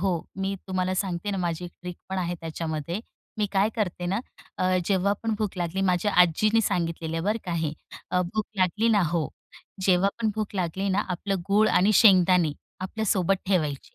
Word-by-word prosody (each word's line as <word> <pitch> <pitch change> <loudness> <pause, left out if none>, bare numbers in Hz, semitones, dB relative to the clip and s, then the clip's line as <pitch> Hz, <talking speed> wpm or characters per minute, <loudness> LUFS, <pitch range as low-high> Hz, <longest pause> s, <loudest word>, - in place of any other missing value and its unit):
हो, 195 +1 +1 0.3
मी 195 +1 -1
तुम्हाला 185 0 -1
सांगते 190 +1 -2
ना 195 - -2
माझी 175 -1 -2
एक 175 - -7
ट्रिक 180 -1 -6
पण 190 - -2
आहे 175 -1 -1
त्याच्यामध्ये. 165 +2 -4 0.4
मी 210 - +2
काय 195 +1 +3
करते 180 -4 -2
ना 195 - +1 0.4
अ, 185 0 +2
जेव्हा 195 +1 +2
पण 225 -1 0
भूक 210 -3 -2
लागली 175 +2 -2
माझ्या 180 +3 +1
आजीनी 215 +7 +3
सांगितलेलं 165 -3 -1
आहे 165 - -2
बरं 215 +2 +1
का 180 - -3
हे. 160 -3 -1 0.4
अ, 180 - +2
भूक 210 +5 -2
लागली 195 +5 +2
ना, 210 -3 +4
हो. 165 -4 0 0.6
जेव्हा 190 +1 +4
पण 220 - +2
भूक 215 -1 -3
लागली 190 +1 -1
ना 195 +2 +2
आपलं 195 +2 -2
गूळ 210 +2 +4
आणि 200 +4 +4
शेंगदाणे 180 -6 +6 0.3
आपल्या 205 +4 -3
सोबत 190 0 +2
ठेवायची. 155 -8 -1
185 Hz, 190 wpm, -26 LUFS, 175-200 Hz, 0.6 s, शेंगदाणे